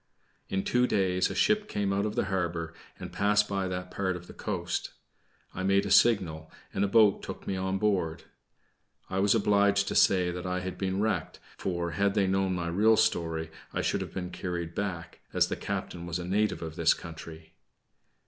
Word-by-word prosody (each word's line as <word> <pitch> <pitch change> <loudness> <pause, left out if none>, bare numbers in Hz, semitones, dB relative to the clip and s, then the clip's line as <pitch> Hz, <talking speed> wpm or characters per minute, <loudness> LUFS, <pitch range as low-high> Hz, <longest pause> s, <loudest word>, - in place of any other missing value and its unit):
In 95 0 -1
two 125 0 +2
days 95 -3 +1
a - - -5
ship 215 0 +2
came 100 -1 -1
out 100 +2 +1
of 105 - -5
the - - +1
harbor, 85 -3 -2 0.3
and - - -8
passed 105 +1 +3
by 100 -1 -1
that 90 0 -5
part 95 -2 -1
of 90 0 -8
the - - -12
coast. - - -3 0.6
I - - -5
made 100 +1 +2
a 100 - -3
signal, 85 -10 +3 0.2
and 100 - 0
a - - +2
boat 105 -1 +4
took - - -8
me 95 - -2
on 95 +1 -1
board. 95 -6 0 0.9
I 95 - 0
was 100 +3 +4
obliged 100 -1 +3
to - - -2
say 90 -2 +4
that 90 +1 -5
I 90 0 -1
had 90 0 -4
been 95 0 -1
wrecked; 110 +1 -1 0.2
for, 85 -2 -2
had 100 +2 +1
they 100 -2 +3
known 95 0 +1
my 85 -1 -2
real 110 +6 +4
story, 80 -7 0 0.2
I - - 0
should - - 0
have - - -5
been 90 -1 -5
carried 85 -2 -4
back, 90 -4 -4
as - - +3
the - - -1
captain 85 -1 -5
was 85 0 -2
a 90 - -5
native 105 +1 0
of 80 -1 -6
this 85 -2 +4
country. 80 -1 -10
95 Hz, 200 wpm, -29 LUFS, 85-100 Hz, 0.9 s, boat